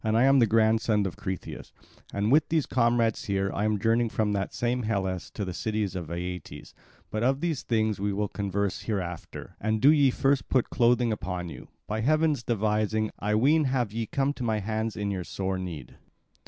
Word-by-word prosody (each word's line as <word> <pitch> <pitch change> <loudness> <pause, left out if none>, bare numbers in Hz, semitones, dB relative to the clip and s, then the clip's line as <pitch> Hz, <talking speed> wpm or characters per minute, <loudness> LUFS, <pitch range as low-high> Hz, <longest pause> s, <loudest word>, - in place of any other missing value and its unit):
I 110 +2 +3
am 135 0 +5
the 115 - +5
grandson 110 -1 +3
of 95 - -3
Cretheus, 95 -1 -6 0.4
and 105 +3 0
with 150 +2 +4
these 160 -3 +1
comrades 115 -2 +1
here 100 -1 0
I 105 - -1
am 110 -1 +1
journeying 115 +3 +2
from 110 -1 0
that 100 -1 -2
same 120 +1 -1
Hellas 95 -5 -2
to 105 - -2
the 90 - -4
city 110 +3 -1
of 90 -5 -4
Aeetes. 90 +1 -6 0.4
But 110 - -2
of 135 +3 +2
these 165 -5 -1
things 110 -3 0
we 100 +1 0
will 105 +1 -1
converse 100 -1 -2
hereafter. 90 -6 -5
And 110 +1 0
do 140 +7 +7
ye 145 -3 +5
first 135 +2 +1
put 130 -3 +1
clothing 120 -1 +3
upon 90 -4 -3
you. - - -10 0.2
By 110 +1 -2
heaven's 155 +1 +2
devising, 110 -1 0
I 105 +1 0
ween, 145 +7 +4
have 125 -5 0
ye 115 -1 -2
come 140 +4 0
to 130 - -6
my 110 -2 +1
hands 110 +2 -2
in 100 -1 -1
your 95 -2 -3
sore 95 +1 -3
need." 85 -9 -7
110 Hz, 195 wpm, -27 LUFS, 100-120 Hz, 0.4 s, do